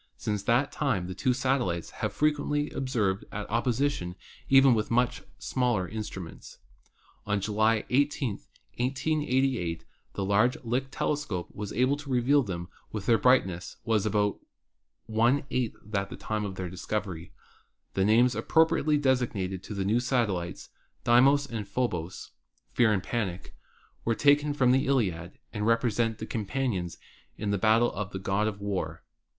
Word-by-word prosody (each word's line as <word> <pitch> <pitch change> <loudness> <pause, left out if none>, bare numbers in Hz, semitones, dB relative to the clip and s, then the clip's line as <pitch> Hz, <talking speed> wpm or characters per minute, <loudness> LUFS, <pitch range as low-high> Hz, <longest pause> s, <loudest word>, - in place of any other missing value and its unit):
Since 105 -2 -2
that 125 +4 +2
time 120 -12 0
the 95 - -5
two 125 +8 +1
satellites 125 -10 0
have - - -2
been - - -18
frequently 150 0 +1
observed 110 -8 -1
at 105 0 -5
opposition 120 -5 0 0.3
even 135 -1 +7
with 110 -2 0
much 120 0 +1 0.2
smaller 120 -8 0
instruments. 95 -5 -7 0.7
On 105 0 +1
July 110 +2 +2
18, 140 -1 +2 0.5
1888, 130 - 0 0.3
the 100 - -2
large 105 +6 +3
Lick 125 +3 -1
telescope 135 -12 -2
was 105 -1 -5
able 130 +3 +2
to 145 -1 -10
reveal 130 +3 +3
them 85 -7 -4 0.2
when 105 -3 -5
their 115 +2 +3
brightness 95 -9 +2
was 110 -3 +1
only - - -1
about 105 -1 +1 0.7
one 115 +5 +2
eighth 125 -3 -1
that 105 -2 -1
at 100 - -7
the - - -7
time 110 -1 -2
of 95 -2 -5
their 95 -1 -4
discovery. 95 -1 -4 0.6
The 95 - +1
names 120 +5 +4
appropriately 155 +5 +2
assigned 115 -9 0
to 105 - -8
the 95 -1 -2
new 110 +4 +2
satellites, 115 -9 -1 0.3
Deimos 135 +4 +5
and 115 -6 -5
Phobos 95 -8 -3 0.4
(Fear 120 -3 +4
and 95 -3 -1
Panic), 100 -7 -3 0.5
were 115 - +1
taken 145 +2 +3
from 125 -3 +4
the 130 +1 +2
Iliad 95 -10 0 0.2
and 105 +1 -1
represent 115 -1 +1
the 110 - -5
companions 110 -5 -2 0.4
in 105 -1 -2
battle 110 +4 +3
of 100 -1 -4
the 95 - -5
God 95 +3 0
of 105 -2 -4
War. 95 -5 -3
115 Hz, 155 wpm, -28 LUFS, 100-130 Hz, 0.7 s, even